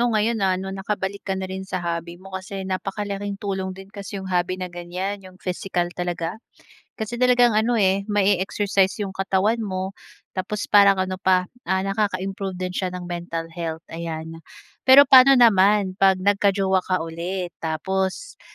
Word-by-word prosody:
'no 240 - +3
ngayon 220 0 +1
na 190 -1 +2
'no, 190 +1 -5
nakabalik 195 0 -3
ka 195 -1 -3
na 190 - -3
rin 190 0 -5
sa 190 -1 -5
hobby 170 0 -3
mo 190 +1 -14
kasi 190 +1 -5
napakalaking 200 +1 -3
tulong 190 -2 -4
din 195 +1 -12
kasi 200 -1 -7
'yung 190 - -6
hobby 180 +1 0
na 185 -1 -6
ganiyan, 180 +3 -4
'yung 185 -1 -14
physical 180 -1 -3
talaga. 175 +2 -4 0.6
Kasi 235 +2 -5
talagang 245 -1 +5
ano, 220 +3 +2
eh, 195 -2 +3
ma-e-exercise 200 -1 +1
'yung 195 - -6
katawan 195 +4 +1
mo, 190 -2 -3 0.4
tapos 200 +2 -3
parang 200 -1 +7
ano 185 0 -5
pa, 185 -1 +3 0.2
ah, 190 0 +1
nakaka-improve 195 -1 -2
din 185 0 -4
siya 185 0 -1
ng 180 - -7
mental 170 -1 -5
health, 165 -1 -5
ayan. 165 -1 -6 0.5
Pero 275 +2 +10
paano 265 0 +8
naman 205 -4 +5
pag 190 0 +3
nagka-jowa 195 0 +2
ka 185 - +2
ulit, 175 +2 -4
tapos 190 - -3
190 Hz, 165 wpm, -23 LUFS, 185-200 Hz, 0.6 s, Pero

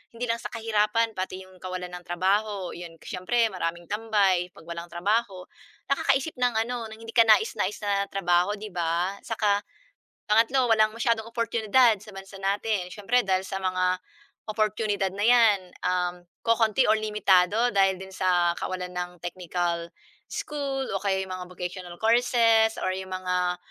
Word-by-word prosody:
hindi 240 +1 -3
lang 230 - -2
sa - - -4
kahirapan 225 0 +1
pati 185 -1 -5
'yong 185 -1 -18
kawalan 185 -1 -5
ng 180 0 -9
trabaho, 195 +2 0
'yon 170 -1 -9
siyempre 225 +6 0
maraming 170 -1 -3
tambay. 205 -5 +2
‘Pag - - -14
walang 170 0 -6
trabaho, 195 +2 -1 0.5
nakakaisip 275 +2 +1
ng 245 -1 +2
ano, 240 -1 -4
ng 220 0 -11
hindi 225 - -7
ka 230 - +6
nais-nais 220 - +3
na 200 -1 +1
trabaho 180 +1 +1
‘di 215 +1 -8
ba. 175 +3 -1
Saka 210 -3 +1 0.7
pangatlo, 235 +4 +3
walang 215 -1 +4
masyadong 230 -1 0
oportunidad 230 -1 +3
sa 215 - -12
bansa 195 +1 -10
natin. 200 -1 0
Siyempre 230 +6 +1
dahil 190 0 +2
sa - - -3
mga 185 0 0 0.5
oportunidad 210 -2 0
na 205 +2 -1
'yan, 230 -4 +6 0.3
um, 180 -1 0 0.3
kokonti 230 +1 +3
or 215 - +6
limitado 210 +1 +3
dahil 195 -1 +4
din 190 0 -9
sa 175 -2 +2
kawalan 180 -1 -4
ng 180 0 -3
technical 175 -1 -2 0.4
school 275 -3 -3
o 195 - -2
kaya 190 -1 +1
'yong 185 - -6
mga 185 0 -6
vocational 180 0 -6
courses 230 -1 +4
or 185 - 0
'yong 190 0 -6
mga 180 -1 -1
200 Hz, 155 wpm, -26 LUFS, 180-225 Hz, 0.7 s, ka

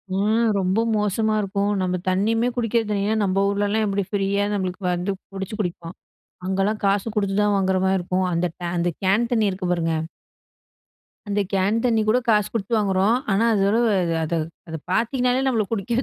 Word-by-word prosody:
ம் 220 +3 +2
ரொம்ப 190 +3 +1 0.2
மோசமா 210 +1 0
இருக்கும். 200 +1 -1
நம்ம 185 0 0
தண்ணியுமே 225 +6 +1
குடிக்கிற 230 -1 +1
தண்ணின்னா, 205 +2 0
நம்ப 190 0 0
ஊர்லலாம் 205 +2 0
எப்படி 200 -1 -1
ஃப்ரியா 200 0 0
நம்மளுக்கு 185 0 -3
வந்து 180 +3 -2 0.2
புடிச்சு 195 +2 -5
குடிப்போம். 170 -2 -5 0.5
அங்கலாம் 195 +3 0
காசு 200 +2 +1
கொடுத்து 200 -2 0
தான் 205 -1 +2
வாங்குற 190 -1 +1
மாதிரி 190 0 +2
இருக்கும். 185 +1 -1
அந்த 170 +1 +1
டே 175 - -5
அந்த 170 0 +1
கேன் 210 +6 +2
தண்ணி 220 -3 +3
இருக்கு 185 -1 -4
பாருங்க. 165 -2 0 1.3
அந்த 205 0 0
கேன் 195 +3 +2
தண்ணி 230 -3 +3
கூட 235 +4 +4
காசு 210 -2 +3
கொடுத்து 230 0 -2
வாங்குறோம். 195 +1 +2 0.2
ஆனா 200 +4 +2
அதோட 200 +2 +2 0.5
அத 165 - -2 0.3
அத 160 - -4
பார்த்தீங்கனாலே 250 +5 +1
நம்மள 235 -5 +2
குடிக்கவே 230 +4 -1
200 Hz, 165 wpm, -23 LUFS, 190-220 Hz, 1.3 s, கூட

